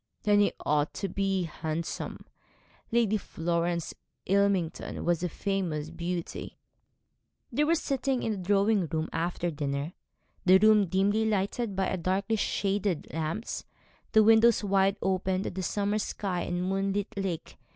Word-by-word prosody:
'Then 205 Hz, -1 st, +4 dB
he 205 Hz, -, +4 dB
ought 150 Hz, 0 st, +1 dB
to 200 Hz, -, -2 dB
be 195 Hz, 0 st, 0 dB
handsome. 160 Hz, 0 st, -4 dB, 0.7 s
Lady 225 Hz, -2 st, +3 dB
Florence 170 Hz, -2 st, -2 dB, 0.3 s
Ilmington 195 Hz, -4 st, 0 dB
was 170 Hz, -1 st, +1 dB
a 180 Hz, -, -1 dB
famous 165 Hz, -5 st, -2 dB
beauty.' 170 Hz, 0 st, -4 dB, 0.9 s
They 300 Hz, -, +2 dB
were 330 Hz, +2 st, +3 dB
sitting 270 Hz, -4 st, -1 dB
in 225 Hz, -, 0 dB
the 210 Hz, -, -2 dB
drawing 200 Hz, 0 st, +2 dB
room 160 Hz, 0 st, -2 dB
after 175 Hz, +1 st, -1 dB
dinner, 145 Hz, +1 st, -3 dB, 0.5 s
the 185 Hz, +1 st, +7 dB
room 210 Hz, 0 st, +5 dB
dimly 200 Hz, +5 st, +2 dB
lighted 205 Hz, +1 st, -1 dB
by 190 Hz, 0 st, 0 dB
darkly 190 Hz, +5 st, 0 dB
shaded 200 Hz, -4 st, -1 dB
lamps, 165 Hz, +8 st, -3 dB, 0.5 s
the 220 Hz, -, +7 dB
windows 225 Hz, +1 st, +5 dB
wide 195 Hz, 0 st, +2 dB
open 190 Hz, 0 st, 0 dB
to -, -, -3 dB
the 190 Hz, -, -4 dB
summer 205 Hz, +3 st, 0 dB
sky 190 Hz, -3 st, -2 dB
and 175 Hz, +1 st, -2 dB
moonlit 195 Hz, +3 st, -1 dB
lake. 190 Hz, -5 st, -4 dB
195 Hz, 140 wpm, -29 LUFS, 170-205 Hz, 0.9 s, the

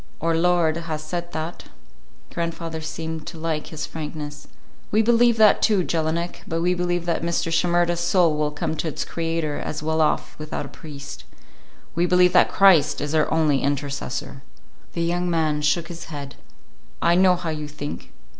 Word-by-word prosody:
"Our 165 Hz, +1 st, +1 dB
Lord 170 Hz, -1 st, +2 dB
has 160 Hz, -2 st, -4 dB
said 175 Hz, +2 st, -4 dB
that." 160 Hz, +2 st, -5 dB, 0.7 s
Grandfather 165 Hz, -1 st, -3 dB
seemed 160 Hz, 0 st, -5 dB
to 170 Hz, -1 st, -7 dB
like 160 Hz, -1 st, -2 dB
his 155 Hz, -1 st, -5 dB
frankness. 150 Hz, -2 st, -7 dB, 0.4 s
"We 220 Hz, +1 st, +3 dB
believe 235 Hz, 0 st, +4 dB
that, 215 Hz, -1 st, +6 dB
too, 205 Hz, -5 st, +3 dB
Jelinek. 165 Hz, +1 st, -2 dB
But 165 Hz, +1 st, -1 dB
we 180 Hz, +1 st, +3 dB
believe 175 Hz, -1 st, -1 dB
that 170 Hz, -, 0 dB
Mr. 170 Hz, 0 st, -1 dB
Shimerda's 175 Hz, 0 st, +2 dB
soul 175 Hz, -2 st, +3 dB
will 150 Hz, 0 st, 0 dB
come 150 Hz, +1 st, -3 dB
to 165 Hz, -, -2 dB
its 155 Hz, -, -3 dB
Creator 165 Hz, -3 st, -2 dB
as 150 Hz, 0 st, -4 dB
well 160 Hz, +1 st, +1 dB
off 155 Hz, -, 0 dB
without 155 Hz, 0 st, -4 dB
a -, -, -9 dB
priest. 145 Hz, -5 st, -9 dB, 0.7 s
We 170 Hz, +1 st, +1 dB
believe 180 Hz, 0 st, +4 dB
that 180 Hz, -, +6 dB
Christ 170 Hz, -7 st, +5 dB
is 145 Hz, +1 st, -3 dB
our 155 Hz, -1 st, +2 dB
only 155 Hz, -4 st, +2 dB
intercessor." 140 Hz, -1 st, -3 dB, 0.5 s
The 170 Hz, -, -1 dB
young 175 Hz, +1 st, 0 dB
man 155 Hz, -3 st, +1 dB
shook 150 Hz, +3 st, +1 dB
his 170 Hz, -1 st, -8 dB
head. 145 Hz, -3 st, -7 dB, 0.7 s
"I 170 Hz, -, +3 dB
know 185 Hz, 0 st, +5 dB
how 175 Hz, -2 st, -3 dB
you 150 Hz, -1 st, -4 dB
think. 145 Hz, 0 st, -7 dB
165 Hz, 175 wpm, -23 LUFS, 155-175 Hz, 0.7 s, that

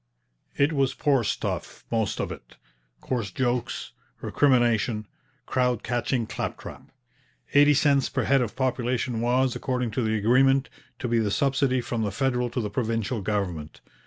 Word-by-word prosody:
It 145 Hz, +3 st, +3 dB
was 135 Hz, -2 st, +1 dB
poor 135 Hz, -4 st, +2 dB
stuff, -, -, -3 dB
most 110 Hz, -3 st, 0 dB
of -, -, -2 dB
it; -, -, -11 dB, 0.5 s
coarse 120 Hz, -6 st, -2 dB
jokes, 120 Hz, +3 st, -2 dB, 0.3 s
recrimination, 120 Hz, -5 st, +2 dB, 0.4 s
crowd 125 Hz, -3 st, 0 dB
catching 120 Hz, 0 st, -1 dB
claptrap. -, -, -6 dB, 0.6 s
Eighty 145 Hz, +1 st, +6 dB
cents 140 Hz, -1 st, +3 dB
per 130 Hz, -2 st, -1 dB
head 135 Hz, +3 st, +3 dB
of 120 Hz, -, -3 dB
population 125 Hz, -2 st, -1 dB
was, 125 Hz, +1 st, +2 dB
according 125 Hz, -3 st, -2 dB
to 115 Hz, -, -1 dB
the 110 Hz, -1 st, 0 dB
agreement, 135 Hz, +5 st, +3 dB, 0.3 s
to 125 Hz, -, -3 dB
be 115 Hz, -1 st, +2 dB
the 110 Hz, -2 st, +1 dB
subsidy 135 Hz, +3 st, +1 dB
from 120 Hz, -1 st, -3 dB
the 105 Hz, -, 0 dB
federal 125 Hz, +1 st, 0 dB
to 120 Hz, +1 st, -2 dB
the 105 Hz, -2 st, -4 dB
provincial 115 Hz, 0 st, -1 dB
government. 90 Hz, -7 st, -3 dB
125 Hz, 150 wpm, -26 LUFS, 110-130 Hz, 0.6 s, Eighty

